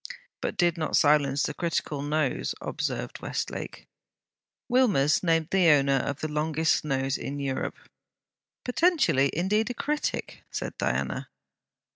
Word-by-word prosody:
'But - - -3
did 175 -2 +2
not 155 - +1
silence 145 -2 +3
the 150 - -1
critical 155 -3 -2
nose,' 145 -2 -1
observed - - -4
Westlake. - - -5 0.8
Wilmers 205 - +3
named 165 -2 +1
the 185 -3 +4
owner 140 -2 +4
of 140 +1 -3
the 155 - -1
longest 155 +1 +1
nose 135 -2 -1
in 140 +1 -5
Europe. 135 -2 -3 0.9
'Potentially, 260 - +3
indeed 210 +7 +1
a 245 - -4
critic!' 300 +4 -3
said - - -5
Diana. - - -1
155 Hz, 125 wpm, -27 LUFS, 140-185 Hz, 0.9 s, the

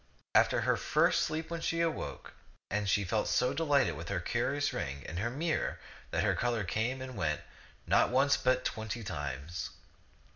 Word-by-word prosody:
After - - +4
her - - +2
first - - +3
sleep 160 +1 -2
she 165 - 0
awoke, 165 -1 -2 0.4
and 105 0 0
she 100 - +3
felt 105 +3 0
so 125 +1 +2
delighted 145 -4 +2
with 85 +1 -7
her 100 -3 0
curious 140 +9 0
ring 70 -1 -4
and 85 - -4
her 115 +4 0
mirror 155 +6 -1 0.3
that - - 0
her - - +3
color 120 -3 0
came 115 +9 -1
and 130 -1 -7
went, 75 -6 0 0.4
not - - +4
once 135 +3 +4
but 130 -1 +1
twenty 110 +1 -3
times. 75 +1 -4
120 Hz, 170 wpm, -32 LUFS, 90-135 Hz, 0.4 s, After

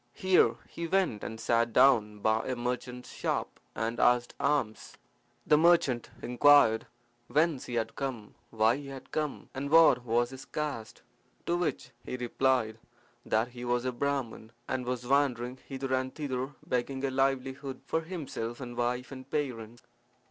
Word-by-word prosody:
Here 185 -1 +4
he 170 - -5
went 185 - +1
and 110 0 -6
sat 115 0 +1
down 110 -6 +4
by 110 +1 +1
a 130 - -1
merchant's 125 +1 -4
shop - - -2 0.2
and 115 +2 -2
asked 120 0 +3
alms. 125 -7 -1 0.5
The 150 - +5
merchant 160 -8 +3
inquired 125 -3 +5 0.4
whence 155 -2 +1
he 120 - -4
had 115 -1 -1
come, 125 -7 -5 0.2
why 110 +2 +2
he 145 -1 -8
had 135 -1 -10
come, 150 -2 -3
and 140 +1 -4
what 160 -5 +6
was 120 +1 +1
his 130 0 -9
caste; 145 -8 -5 0.4
to 170 - +1
which 175 -1 -2
he 125 - -5
replied 125 -2 0 0.4
that 110 +3 +1
he 120 0 -9
was 120 0 0
a 130 - 0
Brahman, 125 -4 -3 0.2
and 125 -1 -2
was 125 -1 -2
wandering 130 -2 +1
hither 135 -1 -3
and 130 0 -1
thither 135 -2 -3
begging 130 +2 -1
a 135 - -1
livelihood 135 0 -1
for 160 - 0
himself 150 -9 -5
and 120 -2 -7
wife 125 +2 -1
and 130 0 -9
parents. 120 -6 -4
125 Hz, 155 wpm, -30 LUFS, 120-140 Hz, 0.5 s, what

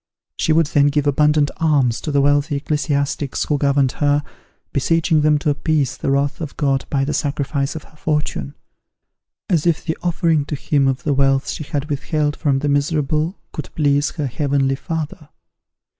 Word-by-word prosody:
She - - 0
would 165 +1 +4
then 145 0 +3
give 145 0 +1
abundant 150 +1 +3
alms 140 -8 +2
to 155 - -3
the 140 -1 +3
wealthy 145 +1 +2
ecclesiastics 145 -1 -1
who 145 -2 0
governed 140 -2 +2
her, 145 0 +3 0.5
beseeching 160 +2 +2
them 150 0 +4
to 150 0 0
appease 145 -2 0
the - - -3
wrath 140 +2 0
of 150 -3 -6
God 135 -3 +1
by 135 -1 +1
the 150 - -2
sacrifice 140 0 -1
of 160 - -6
her - - -20
fortune, 150 - -2 0.9
as 170 -2 +1
if 165 -2 +1
the 160 - -1
offering 165 -3 +1
to 150 - -3
Him 140 0 +1
of 130 -1 -1
the 145 - +1
wealth 135 0 +2
she - - -5
had 145 -1 -3
withheld 150 0 -1
from 140 -4 +1
the 145 +2 -1
miserable 150 +4 0
could 150 - -6
please 145 -1 +2
her 150 -4 -2
Heavenly 135 +1 0
Father! 160 +1 -5
145 Hz, 175 wpm, -20 LUFS, 140-155 Hz, 0.9 s, would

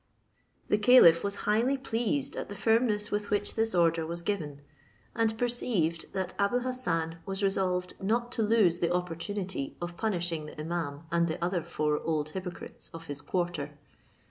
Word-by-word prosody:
The 210 - +3
caliph 210 -8 +7
was 200 0 -1
highly 235 +6 +2
pleased 225 - -1
at - - -5
the 205 - -6
firmness 220 -1 +2
with 205 0 -1
which 205 0 0
this 225 -3 0
order 165 -1 +3
was 170 +2 -5
given, 155 -8 -3 0.5
and 225 -1 +1
perceived 220 -9 0
that 190 -1 -2
Abou 205 +5 +2
Hassan 170 -11 -2
was 195 +1 -2
resolved 185 -2 0
not 235 +5 0
to 235 - -1
lose 210 -6 +3
the 170 - +1
opportunity 180 -2 -3
of 175 0 -5
punishing 175 -6 -1
the - - -9
imaum 155 -2 -4
and 170 0 +3
the 160 - -2
other 180 -1 0
four 150 -2 -1
old 155 -2 -1
hypocrites 180 +1 -6
of 165 0 -8
his 145 -2 -6
quarter. 150 -3 -2
180 Hz, 165 wpm, -29 LUFS, 165-210 Hz, 0.5 s, caliph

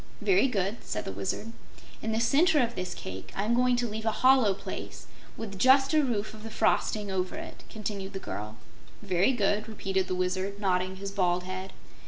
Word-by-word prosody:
"Very 375 -8 +4
good," 200 -2 -1
said 105 - -4
the - - -3
Wizard. 100 - -3 0.5
"In 220 - -2
the 220 - +1
center 295 +8 +4
of 235 -2 +1
this 185 -3 -4
cake 95 0 -7
I'm 210 +4 +1
going 250 +1 +4
to 240 0 0
leave 220 +1 -4
a - - +4
hollow 255 -7 +6
place, 200 - -7 0.3
with 200 -4 -6
just 265 +5 +5
a 305 -1 +5
roof 215 -5 -1
of 215 - -11
the 225 - -7
frosting 215 -2 +1
over 185 -1 -1
it," - - -8
continued 200 -2 -5
the - - -3
girl. 105 - -6 0.5
"Very 190 +3 +3
good," 210 -3 +1
repeated 195 -3 -1
the 185 - -1
Wizard, 185 +2 -1
nodding 185 -1 0
his 195 +1 -6
bald 180 -2 +1
head. 185 +1 -5
205 Hz, 195 wpm, -29 LUFS, 185-230 Hz, 0.5 s, hollow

